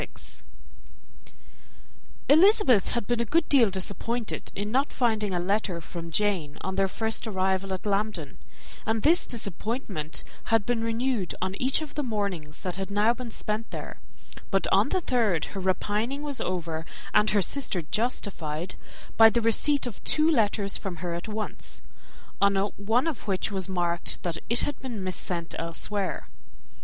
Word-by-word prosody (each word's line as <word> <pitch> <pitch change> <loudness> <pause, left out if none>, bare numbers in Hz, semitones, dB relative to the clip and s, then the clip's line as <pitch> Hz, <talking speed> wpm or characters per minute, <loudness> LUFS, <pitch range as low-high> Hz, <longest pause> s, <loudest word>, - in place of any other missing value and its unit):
Elizabeth 310 - +6
had 235 -3 -1
been 240 +1 0
a - - +2
good 310 +7 +2
deal 250 -7 +5
disappointed 205 +5 -2
in 205 +2 -3
not 270 +4 +2
finding 220 -5 +1
a 180 - 0
letter 190 -1 0
from 170 0 -7
Jane 170 -5 0
on 190 - -3
their 195 0 +2
first 220 +3 -1
arrival 190 -1 0
at 190 +1 -4
Lambton; 200 -7 -1 0.5
and 220 0 +1
this 335 +4 +4
disappointment 205 - -2 0.2
had 225 -3 +2
been 240 -2 0
renewed 230 -3 -1
on 185 +1 -2
each 265 +4 +2
of 300 - -9
the 295 - -1
mornings 200 - -3
that 180 -1 -1
had 195 0 -3
now 210 +3 +3
been 245 -1 -7
spent 215 0 -3
there; - - -7 0.5
but - - +2
on - - +4
the 370 - +1
third 225 - +1
her 195 - -4
repining 210 +8 -1
was 285 -3 -2
over, 165 -3 -2 0.3
and 210 0 +5
her 205 - +3
sister 195 -7 +2
justified, 180 -5 -2 0.4
by 225 0 +9
the 235 - +1
receipt 255 +6 +2
of 240 -5 -7
two 310 0 +3
letters 210 -8 +2
from 195 -3 -4
her 170 0 -4
at 170 +5 -5
once, 215 0 -5 0.6
on 200 0 +4
one 205 +6 +1
of 315 -9 -3
which 195 +1 0
was 195 -1 -1
marked 175 -2 -1
that 170 -2 -2
it 235 - +3
had 290 - -2
been 235 -7 -5
mis 185 -1 -1
sent 170 -2 -3
elsewhere. 185 +4 -3
210 Hz, 160 wpm, -27 LUFS, 185-235 Hz, 0.6 s, by